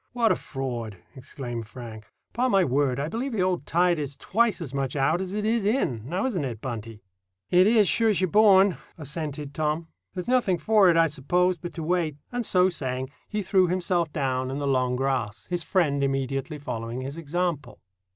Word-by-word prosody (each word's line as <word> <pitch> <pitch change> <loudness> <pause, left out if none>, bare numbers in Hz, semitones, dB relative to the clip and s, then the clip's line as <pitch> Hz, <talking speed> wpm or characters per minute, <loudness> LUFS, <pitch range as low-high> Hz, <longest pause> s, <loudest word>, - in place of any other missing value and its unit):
"What 235 -2 +3
a - - +3
fraud!" 120 -6 -5 0.2
exclaimed 125 -4 -6
Frank. 110 -2 -10 0.3
"'Pon 255 +2 +1
my 195 -4 +4
word, 135 -2 +1
I 145 - -1
believe 240 - -3
the 195 -4 +1
old 180 -5 -1
tide 175 -1 +2
is 140 -1 -5
twice 230 +1 +1
as 150 -6 -6
much 135 -1 -2
out 145 +6 +2
as 190 +1 -4
it 210 0 -1
is 225 0 +1
in; 200 - 0
now 180 +7 -1
isn't 200 - -1
it, 120 -5 -4
Buntie?" 115 -3 -6 0.5
"It 180 +2 +6
is, 215 -3 +5
sure's 220 -1 +3
you're 185 - +2
born," 195 -1 +5 0.2
assented 150 -1 -5
Tom. 155 +2 -1 0.3
"There's 180 +2 -4
nothing 245 -8 +2
for 210 0 +4
it, 165 - +4
I 165 - +6
suppose, 175 +4 0
but 175 - -7
to 165 - -4
wait;" 165 -3 0
and 245 0 -2
so 185 -3 +3
saying, 130 -6 -3 0.2
he 210 -1 -3
threw 185 -1 +3
himself 175 -2 0
down 130 -4 -1
in 135 - -3
the 145 - -2
long 130 -2 +1
grass, 125 -5 -2
his 175 -1 0
friend 150 -7 +1
immediately 135 +2 -2
following 115 -3 -5
his 135 +4 -6
example. 165 -4 -3
155 Hz, 195 wpm, -26 LUFS, 135-185 Hz, 0.5 s, It